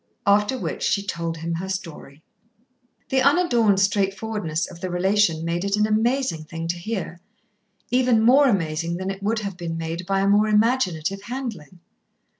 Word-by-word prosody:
After 210 +5 +3
which - - -4
she 200 0 0
told 170 -3 -3
him 165 +1 -4
her 180 +3 -4
story. 160 -6 -7 0.9
The 265 0 +2
unadorned 245 - +3
straightforwardness 195 -3 0
of 175 -2 -12
the 185 - -3
relation 180 -2 +1
made 170 +1 -1
it 200 0 0
an 210 0 +2
amazing 220 - 0
thing 165 +1 -6
to 175 - 0
hear, 185 -3 -5 0.7
even 250 -3 +3
more 275 +4 +6
amazing 170 -5 -1
than 190 +1 -3
it 195 0 -8
would 215 +3 0
have 200 -3 -5
been 165 -2 -4
made 165 +2 -5
by 195 0 +1
a 195 - +1
more 205 +2 +4
imaginative 205 -5 +1
handling. 205 - -7
195 Hz, 165 wpm, -23 LUFS, 170-220 Hz, 0.9 s, more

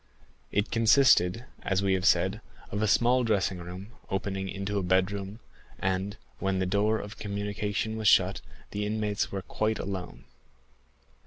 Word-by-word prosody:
It 105 +2 0
consisted, 115 -3 +4 0.2
as 95 0 0
we 95 -1 +2
have 95 0 +1
said, 95 +5 +3 0.3
of 105 - -2
a 110 - +2
small 125 +4 +4
dressing 100 -5 +1
room, 90 +4 -8 0.2
opening 95 -1 -2
into 100 +1 -2
a - - -1
bedroom, 95 +3 0 0.4
and, 95 +2 -1 0.2
when 95 -1 0
the 95 - +1
door 105 +4 +2
of 105 -1 -8
communication 105 +2 -2
was 110 -1 0
shut, - - +4 0.3
the 105 0 -2
inmates 105 -1 -1
were 95 -1 -4
quite 110 +2 -1
alone. 95 -2 -5
100 Hz, 150 wpm, -28 LUFS, 95-110 Hz, 0.4 s, consisted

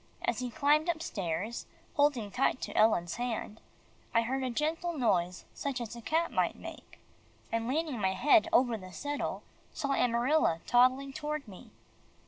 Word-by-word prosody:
As 240 - 0
he 250 -1 -3
climbed 295 +7 +2
upstairs, 210 - -3 0.3
holding 275 -8 +2
tight 255 +2 +1
to - - -5
Ellen's 175 -6 +3
hand, 235 -3 -3 0.5
I 230 - +5
heard 265 +3 -1
a 255 - -1
gentle 320 +6 -1
noise 180 -8 +1
such 275 -3 -3
as 235 -1 -5
a 235 - -8
cat 325 +8 0
might - - +1
make, - - -10 0.5
and 230 0 -1
leaning 290 -3 -1
my 190 -1 +2
head 300 - +4
over 245 -8 +3
the 185 -1 -11
settle, 290 +5 -3 0.3
saw 280 - -2
Amarilla 240 - +2
toddling 255 +3 +3
toward 300 -2 -4
me. 190 -3 -12
250 Hz, 155 wpm, -31 LUFS, 225-295 Hz, 0.5 s, I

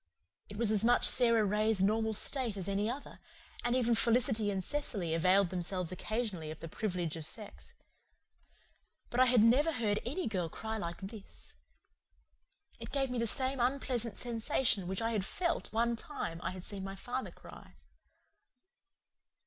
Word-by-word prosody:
It 205 - -9
was 225 -1 +1
as 215 -1 +2
much 245 +1 +4
Sara 230 -3 +4
Ray's 210 +1 +1
normal 220 +2 +2
state 240 -2 +4
as 190 -1 -4
any 200 +2 0
other, 270 +4 -7 0.4
and 240 +1 +1
even 240 -2 +2
Felicity 230 -1 +2
and 190 -2 -2
Cecily 200 - -2
availed 185 +3 +3
themselves 180 -1 -2
occasionally 200 -4 -3
of 155 - -7
the 165 - -7
privilege 175 -3 -3
of 160 - -6
sex. 210 +6 -7 1.4
But 240 - -1
I 255 - +7
had 245 -3 +5
never 270 +8 +4
heard 215 -7 0
any 295 +10 -3
girl 185 -6 -2
cry 220 +5 -5
like 170 -1 -5
this. 200 +1 -10 1.3
It - - -8
gave 270 -2 0
me 250 - -2
the 230 - 0
same 260 +3 -1
unpleasant 245 -3 -1
sensation 230 -4 0
which 190 +4 -3
I 225 - 0
had 210 -4 0
felt 345 - -2
one 235 +1 +1
time 230 - -5
when 170 - -4
I - - 0
had 185 -1 -8
seen 195 -1 -5
my 195 0 -6
father 245 +6 -4
cry. - - -14
220 Hz, 165 wpm, -33 LUFS, 190-245 Hz, 1.4 s, I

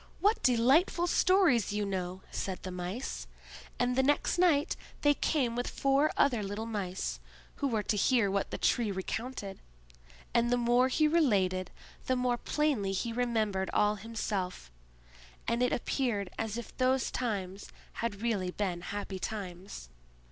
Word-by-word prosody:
"What 420 +3 +2
delightful 265 +9 +4
stories 345 - +3
you 210 0 0
know!" 185 -1 -4
said 190 -2 -4
the 185 - -5
Mice; 180 +8 -5 0.5
and 245 0 +1
the 265 - +4
next 290 +5 +1
night 320 -5 +3 0.3
they 290 0 +5
came 265 -5 0
with 245 0 -2
four 275 +2 +2
other 245 -6 +3
little 205 +2 -4
Mice, 195 -5 -3 0.4
who 285 - 0
were 220 -5 0
to 210 - 0
hear 210 -1 +3
what 200 0 0
the - - -4
Tree 235 -3 +2
recounted; 200 +1 -4 0.7
and 235 0 +3
the 245 - +3
more 240 +1 +3
he 305 +4 +3
related, 195 - +2 0.4
the 255 - +2
more 250 -1 +1
plainly 275 -11 0
he 230 +4 -2
remembered 220 -6 0
all 210 0 +4
himself; 200 - -4 0.8
and 235 +1 +1
it 250 - +3
appeared 235 -6 -1
as 225 0 -3
if 235 - -8
those 255 0 +2
times 200 -5 -3 0.3
had 225 -2 -3
really 205 -6 0
been 180 -2 -2
happy 200 0 -5
times. 185 - -6
230 Hz, 150 wpm, -31 LUFS, 195-255 Hz, 0.8 s, they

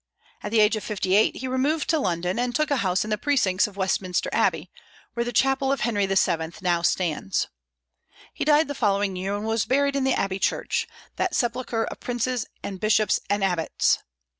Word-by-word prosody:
At 210 - -4
the 225 -1 +4
age 210 +1 +4
of 215 - -5
fifty 190 -3 -2
eight 210 +2 +4
he 260 - -5
removed 275 +4 0
to 320 - +2
London, 180 - -1
and 245 0 -1
took 305 -1 +1
a 285 - +3
house 185 -5 +1
in 215 - -6
the 210 - 0
precincts 210 -11 +2
of 200 -1 -13
Westminster 185 -1 -1
Abbey, - - +1 0.4
where 235 - -1
the 240 - -3
chapel 270 +3 +2
of 275 - -1
Henry 205 -4 +1
VII. 170 -4 +1
now 175 -2 +2
stands. 165 - 0 0.9
He - - -3
died 305 +1 +4
the 285 - -3
following 200 -5 0
year, 190 +2 -2
and 205 +1 -4
was 225 -1 0
buried 280 +4 +1
in 275 - +1
the 265 -1 +2
Abbey 195 -1 -1
church, - - 0 0.3
that 370 - 0
sepulchre 240 -1 -1
of - - -7
princes 245 -1 -2 0.2
and 195 -2 -5
bishops 215 -1 +2
and 205 0 +1
abbots. 175 -4 +1
215 Hz, 200 wpm, -25 LUFS, 190-255 Hz, 0.9 s, the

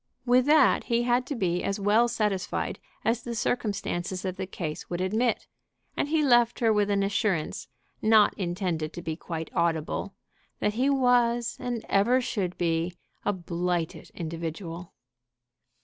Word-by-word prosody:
With 250 +2 +4
that 300 -2 +5
he 235 0 +1
had 245 +1 +1
to 285 - -3
be 180 -5 0
as 200 +1 -1
well 210 +4 +4
satisfied 210 -5 -1 0.3
as 230 +2 +1
the 240 -1 -5
circumstances 195 -5 -2
of 185 -1 -2
the 185 - -4
case 160 -5 -5
would 175 - -3
admit, 220 +6 0 0.5
and - - 0
he 315 0 +2
left 240 -4 +4
her 225 -2 +3
with 210 -1 +2
an 200 -1 +2
assurance, 195 -5 -1 0.3
not 215 -1 +5
intended 175 -4 -2
to 175 - -7
be 160 -2 -3
quite 165 -1 -6
audible, 170 +3 -1 0.4
that 210 - +1
he 255 +5 +1
was 245 -3 +2
and 240 -2 -3
ever 235 +6 +3
should 200 -7 -2
be 170 +1 0 0.3
a 205 - +3
blighted 175 -2 -3
individual. 165 +1 -5
200 Hz, 150 wpm, -27 LUFS, 175-240 Hz, 0.5 s, that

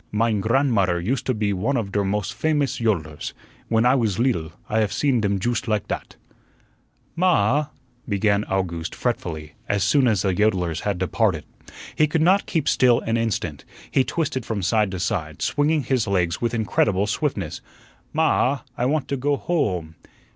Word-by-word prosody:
Mein 110 -1 +1
gran'mutter 110 -7 +2
used 125 +8 -2
to 130 - +2
be 105 -1 0
one 115 +9 0
of 105 -4 -3
der 100 0 +1
mos' 100 0 -1
famous 150 -3 0
yodlers. 80 -10 -1 0.3
When 115 +1 +2
I 125 - +5
was 110 -8 +1
leedle, 115 - 0 0.2
I 110 - +1
haf 105 -2 +1
seen 135 -5 +1
dem 100 -1 +1
joost 120 +4 -1
like 105 -1 0
dat." - - -5 1.0
"Ma 185 +2 +2
ah," 145 - +2 0.4
began 100 0 +2
Owgooste 85 -4 -2
fretfully, 80 -11 -3 0.2
as 100 -2 +1
soon 130 +6 +3
as 105 -5 +2
the 95 -2 +1
yodlers 90 -5 +1
had 100 -3 -2
departed. 95 -3 0 0.5
He 155 - +4
could 160 +2 0
not 190 +4 +3
keep 160 - -1
still 125 -2 +4
an 115 - -1
instant; 115 -3 -2 0.3
he 135 - +3
twisted 150 -4 -2
from 110 -3 -3
side 105 +2 +2
to 95 -1 -5
side, 85 -6 -2
swinging 150 +1 +1
his 125 -5 0
legs 90 -4 0
with 120 0 0
incredible 105 -3 +1
swiftness. 105 - -2 0.5
"Ma 160 - +1
ah, 140 -3 +2
I 125 - 0
want 145 0 0
to 140 - -1
go 145 +3 +1
ho 140 - 0
ome." 80 -1 -11
110 Hz, 180 wpm, -23 LUFS, 95-130 Hz, 1.0 s, I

